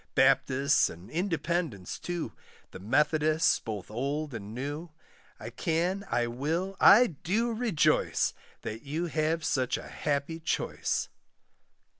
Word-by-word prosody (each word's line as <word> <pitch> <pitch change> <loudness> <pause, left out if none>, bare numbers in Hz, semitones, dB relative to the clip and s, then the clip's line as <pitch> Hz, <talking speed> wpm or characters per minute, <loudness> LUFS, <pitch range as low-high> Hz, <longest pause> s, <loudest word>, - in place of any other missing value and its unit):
Baptists, 140 +3 +4
and 85 +3 -11
Independents 165 - -2
too, 175 -2 -4 0.4
The - - -9
Methodists, 150 - +2
both 105 -4 -6
old 140 +5 -2
and 105 -2 -6
new; 145 +8 -5 0.5
I - - -7
can, 175 +5 -1
I 120 0 +1
will, 160 +11 -2
I 240 +5 +8
do 215 - -1
rejoice, 220 -9 +2 0.3
That 115 0 -5
you 155 +5 -3
have 160 0 0
such 130 -2 +1
a - - -9
happy 145 +3 -2
choice. 160 - -1
155 Hz, 120 wpm, -29 LUFS, 130-170 Hz, 0.5 s, I